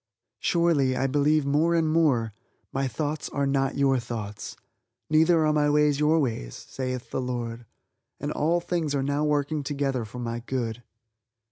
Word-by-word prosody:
Surely 155 -7 +2
I 135 - +1
believe 145 +2 +2
more 155 +4 +2
and 165 -1 +2
more: 145 -9 +2 0.4
"My 135 0 0
thoughts 150 +5 -3
are 140 -1 -1
not 135 -1 0
your 135 -2 +3
thoughts, 110 -3 -6 0.6
neither 160 +1 +4
are 155 - +3
my 150 -1 +2
ways 150 -1 +3
your 150 +2 +3
ways, 115 - -2
saith 130 -2 -5
the - - -1
Lord," 120 -2 -4 0.5
and 145 +2 -3
all 170 +4 +1
things 165 -4 -1
are 135 - 0
now 145 +2 0
working 150 0 0
together 140 -3 -1
for 110 +3 -9
my 120 -1 -3
good. 120 -2 -3
140 Hz, 160 wpm, -26 LUFS, 125-150 Hz, 0.6 s, neither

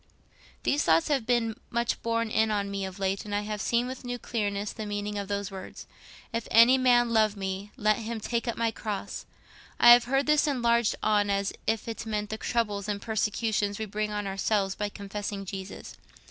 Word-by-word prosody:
"These 290 - +2
thoughts 165 - +3
have 270 -6 0
been 235 -3 +1
much 235 0 -1
borne 230 -1 -1
in 220 0 +2
on 200 -2 -1
me 195 -1 -2
of 190 0 -7
late, 195 0 -1
and 205 -1 -4
I 205 - +1
have 210 -1 -4
seen 235 +3 +1
with 260 +1 -6
new 245 0 -3
clearness 205 -4 -2
the 215 -2 -6
meaning 205 0 -3
of 200 - -4
those 200 0 -3
words, 190 -1 -9 0.5
'If 230 -1 -2
any 235 +3 +7
man 240 -2 +4
love 215 -2 +3
me, 195 +1 -4
let 215 -3 +2
him 230 0 -4
take 235 +3 -2
up 235 - -2
my 230 -1 +1
cross.' 210 -3 -5 0.5
I 240 - +9
have 240 0 +8
heard 270 +3 +1
this 300 0 +3
enlarged 235 -4 +2
on 205 -1 +2
as 200 0 0
if 225 0 0
it 230 - -4
meant 210 -1 -2
the 220 - -3
troubles 210 -4 -1
and 205 -1 -1
persecutions 215 -1 -1
we 220 - -3
bring 210 +1 -3
on 205 -1 -3
ourselves 195 0 0
by 205 +1 -3
confessing 200 0 -5
Jesus. 190 0 -7
215 Hz, 200 wpm, -28 LUFS, 200-235 Hz, 0.5 s, I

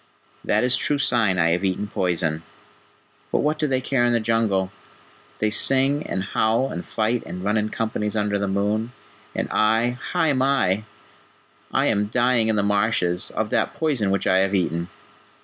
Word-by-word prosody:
That 105 - +1
is 125 +1 +2
true 145 - +2
sign 115 -8 +2
I 85 -1 +3
have 90 +3 0
eaten 95 +1 -1
poison.... 85 -5 -1 0.9
But - - +1
what 155 +1 0
do 155 - +1
they 130 -2 0
care 130 -1 0
in 120 0 +2
the 120 - +2
Jungle? 110 -4 0 0.7
They 105 0 0
sing 135 +6 +3
and 95 - -2
howl 110 +6 0
and 85 - -5
fight, 115 +2 -1
and 90 +2 -6
run 105 +2 0
in 110 0 0
companies 110 -1 -2
under 105 -1 0
the 100 - -1
moon, 105 +4 -1 0.4
and - - -1
I 115 +3 +2
Hai 165 -4 +2
mai! 130 -7 +1 0.9
I - - +1
am 105 0 +1
dying 120 0 +2
in 110 - +1
the 100 - +1
marshes, 100 -3 0
of 110 -1 -2
that - - 0
poison 135 -11 0
which 100 0 0
I 95 - +3
have 95 +1 +1
eaten." 85 -1 -1
110 Hz, 180 wpm, -23 LUFS, 95-120 Hz, 0.9 s, I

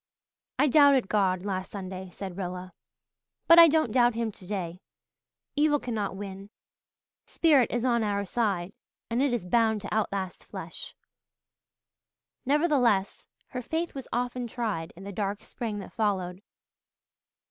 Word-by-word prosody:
"I 295 - +4
doubted 280 -5 +5
God 190 -3 +1
last 190 -2 -3
Sunday," 190 -2 -6
said 185 +1 -7
Rilla, 180 -1 -5 0.7
"but 335 0 +8
I 335 - +11
don't 310 -6 +2
doubt 240 -1 +4
him 230 -1 -1
today. 185 -2 -5 0.7
Evil 295 0 +3
cannot 220 -6 -3
win. 195 0 -8 0.8
Spirit 290 -7 +4
is 240 +1 -1
on 235 -2 +2
our 200 -1 -1
side 195 -4 -1 0.4
and 235 +3 +1
it 280 -1 +2
is 240 -6 -2
bound 220 +2 +2
to 200 - -5
outlast 200 -4 -2
flesh." - - -8 1.5
Nevertheless 270 - +2 0.2
her 250 - -4
faith 325 +7 -3
was 270 -2 -7
often 245 0 -2
tried 215 -9 -3
in 185 - -11
the 200 - -6
dark 200 +1 -3
spring 225 -3 -5
that 200 - -8
followed. 190 -4 -1
210 Hz, 135 wpm, -28 LUFS, 190-245 Hz, 1.5 s, I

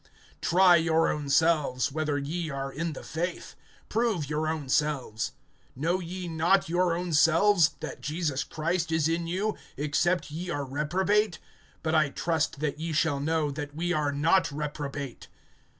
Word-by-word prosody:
(5)Try 175 -2 +5
your 165 0 +3
own 150 -2 -3
selves, 150 -4 +2
whether 150 -1 -1
ye 155 +4 -3
are 135 -1 -4
in 165 +1 -3
the - - -9
faith; 170 +3 -4 0.3
prove 215 -9 0
your 155 +2 -1
own 155 -3 -2
selves. 130 -6 0 0.4
Know 165 +7 0
ye 180 +1 -6
not 170 +4 +2
your 175 0 +1
own 175 -1 -3
selves, 165 +1 +4
that - - -6
Jesus 150 -2 -1
Christ 165 +1 -2
is 160 -1 +2
in 165 +1 -1
you, 200 +5 -1 0.2
except 150 +4 0
ye 175 +4 -5
are 145 -4 -2
reprobate? 180 +8 +1 0.5
(6)But 160 0 0
I 155 -3 +4
trust 160 -1 -1
that 150 -1 -2
ye 165 0 -3
shall 150 -2 +1
know, 155 0 0
that 145 0 -6
we 175 +2 -1
are 150 -2 +1
not 160 +6 +2
reprobate. 145 -2 -5
160 Hz, 160 wpm, -28 LUFS, 145-175 Hz, 0.5 s, 5)Try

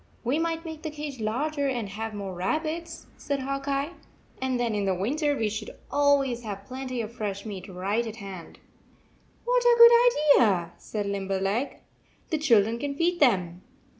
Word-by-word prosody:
"We 260 +6 +1
might 330 0 -2
make 320 -1 -7
the 315 - -4
cage 295 -3 -6
larger 280 +7 -1
and 240 -5 -2
have 220 +2 -5
more 195 -2 -5
rabbits," 310 - -3
said 280 -1 -2
Hawk 275 +1 -3
Eye, 280 +3 0 0.5
"and 260 -1 0
then 235 -2 0
in 195 -3 0
winter, 290 - 0
we 220 - +1
should 215 +1 -5
always 280 -4 +2
have 200 -3 -6
plenty 255 0 -4
of 225 +1 -6
fresh 205 -4 -4
meat 200 -4 -6
right 200 +5 -1
at 220 - -6
hand." 195 -6 -9 0.9
"What - - +2
a 480 -1 +5
good 470 -10 +7
idea!" 180 -7 +2
said 210 -2 -4
Limberleg. 195 +4 -2 0.5
"The 315 - +1
children 230 -5 +3
can 280 +2 -3
feed 345 +3 +1
them." 185 - +2
245 Hz, 165 wpm, -27 LUFS, 205-295 Hz, 0.9 s, good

